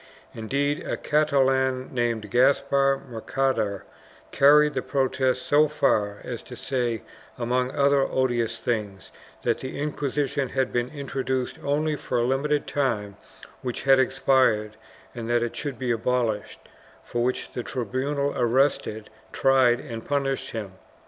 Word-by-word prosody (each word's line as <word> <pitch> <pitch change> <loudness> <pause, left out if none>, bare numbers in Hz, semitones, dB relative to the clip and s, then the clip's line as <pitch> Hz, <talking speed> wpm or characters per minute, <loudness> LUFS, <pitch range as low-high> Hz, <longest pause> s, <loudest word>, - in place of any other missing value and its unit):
Indeed, 140 +6 -1
a - - -3
Catalan 135 -4 +1
named 115 -4 -1
Gaspar 135 +2 +3
Mercader 115 -4 -1 0.5
carried 150 +2 +5
the - - -1
protest 130 -2 0
so 150 +1 +4
far 105 -9 0
as - - -5
to - - -11
say, 120 -5 -2 0.3
among 125 +1 0
other 140 +1 +3
odious 120 -4 0
things, 105 -5 -3 0.3
that 120 - +1
the 130 +1 -6
Inquisition 145 -2 -1
had 130 - -1
been 120 0 0
intro 140 -2 -5
duced 130 -1 -2
only 150 +2 0
for - - -3
a 120 - +2
limited 140 +4 0
time 110 -8 -1 0.5
which 125 -2 -4
had 135 -1 +5
expired 130 -5 +2 0.4
and 115 -1 -6
that 120 0 +2
it 120 - -4
should 145 -4 -4
be 125 -2 -1
abolished, 115 -2 -1 0.4
for 120 0 -2
which 125 +1 -2
the 125 - -4
tribunal 130 +5 -2
arrested, 120 -3 +1 0.2
tried 130 -3 +4
and 115 -5 -7
punished 140 -1 -1
him. 105 -4 -5
130 Hz, 135 wpm, -25 LUFS, 120-140 Hz, 0.5 s, carried